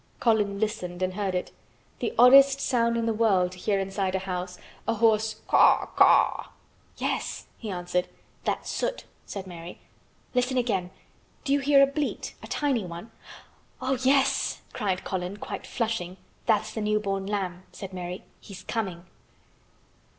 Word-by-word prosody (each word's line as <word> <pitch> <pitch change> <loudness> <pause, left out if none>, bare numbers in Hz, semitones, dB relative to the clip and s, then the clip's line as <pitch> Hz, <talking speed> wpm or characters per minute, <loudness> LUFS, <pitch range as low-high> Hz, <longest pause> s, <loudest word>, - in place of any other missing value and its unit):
Colin 210 -4 +2
listened 185 -5 -2
and 185 0 0
heard 195 -1 -2
it, 180 - -2 0.5
the - - -1
oddest 275 +2 +8
sound 235 -4 +1
in 230 - 0
the 225 - +1
world 195 -5 +2
to 180 - -11
hear 200 +1 +1
inside 195 0 -1
a 190 0 -2
house, 180 -1 -4 0.3
a 230 - +1
hoarse 220 -1 +3
"caw - - +5
caw." - - +4 0.5
"Yes," - - -2
he 220 - -6
answered. 180 -1 -1 0.4
"That's - - -2
Soot," - - -2 0.2
said 195 -2 -6
Mary. 175 -1 -9 0.6
"Listen 250 +1 +1
again. 195 -8 0 0.5
Do 275 - +1
you 285 - +3
hear 275 0 +5
a - - +8
bleat—a 280 +1 -4
tiny 275 -7 0
one?" 175 +5 -8 0.7
"Oh, 260 +1 0
yes!" 270 +1 +2
cried 195 -5 -1
Colin, 185 +1 -3
quite - - -6
flushing. 220 -6 -2 0.3
"That's 220 -3 +2
the 220 - -3
new 210 0 +1
born 195 -2 -2
lamb," 190 -3 -2
said 195 -1 -8
Mary. 180 0 -5 0.2
"He's 185 -2 -11
coming." 185 -6 -3
205 Hz, 150 wpm, -27 LUFS, 185-235 Hz, 0.7 s, oddest